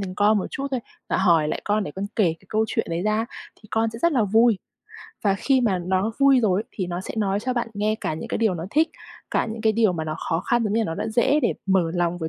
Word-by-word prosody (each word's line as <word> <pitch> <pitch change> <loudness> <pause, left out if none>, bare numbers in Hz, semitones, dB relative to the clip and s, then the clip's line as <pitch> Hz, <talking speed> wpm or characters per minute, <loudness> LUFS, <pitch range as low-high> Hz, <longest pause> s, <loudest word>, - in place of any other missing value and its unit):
đến 185 -2 -5
con 210 +1 +3
một 190 - -2
chút 275 - -3
thôi, 260 -2 -1 0.3
và - - +1
hỏi 165 -5 +4
lại - - -2
con, 210 0 +1
để - - -5
con 190 +6 -4
kể 215 - +4 0.2
cái 190 - -23
câu 220 +1 +1
chuyện - - -1
đấy 165 +1 -1
ra 215 +1 +1
á, 225 - -1 0.4
thì 215 - -16
con 225 0 +1
sẽ 230 - -7
rất 340 - +4
là 245 -6 +3
vui. 220 +1 +4 0.7
Và 200 -2 +3
khi 265 +6 +2
mà 210 -7 +1
nó 190 +4 +1
vui 275 -2 +5
rồi 200 -4 +2
ấy, - - -31
thì 185 - -3
nó 175 0 -4
sẽ - - -7
nói 200 -1 0
cho 255 +3 -1
bạn 240 -2 -1
nghe 210 +1 0
cả - - -2
những 155 - -7
cái - - -2
điều 220 -5 +2
nó 165 -1 -5
thích, 315 +5 +3 0.4
cả - - +1
những 225 0 -6
cái 220 -1 +3
điều 220 -3 +3
mà 160 -3 -3
nó 155 0 -3
khó 165 - +1
khăn, 240 +3 +1
giống 205 - -1
như 225 - +2
là - - +1
nó 165 - -3
đã - - -3
dễ 240 +7 +3
để - - +2
mở 190 -4 +2
lòng 175 0 0
với 160 -2 -3
210 Hz, 305 wpm, -24 LUFS, 185-230 Hz, 0.7 s, vui